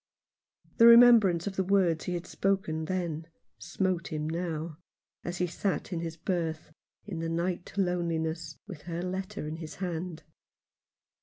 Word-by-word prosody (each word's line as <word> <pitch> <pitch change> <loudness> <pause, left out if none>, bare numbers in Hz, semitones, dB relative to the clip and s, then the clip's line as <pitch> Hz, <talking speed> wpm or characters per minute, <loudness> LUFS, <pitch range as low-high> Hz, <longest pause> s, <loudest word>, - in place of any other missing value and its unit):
The 230 - +8
remembrance 235 -8 +7
of 200 -2 -4
the 190 - +2
words 185 -4 +2
he 180 - -2
had 175 0 -4
spoken 190 -6 -1
then 170 -3 -3 0.3
smote 180 0 -1
him 155 -1 -3
now, 165 -1 -3 0.4
as 175 0 -4
he 180 - +1
sat 185 +2 -2
in 170 - -1
his 165 -1 -5
berth, 165 -3 -2 0.3
in 190 -6 -5
the 165 0 -2
night 175 +2 -2
loneliness, 165 -4 -1
with 185 -8 -9
her 170 +1 -3
letter 185 -4 -4
in 155 +1 -5
his 160 -2 -8
hand. 175 -3 -4
175 Hz, 150 wpm, -29 LUFS, 160-185 Hz, 0.4 s, The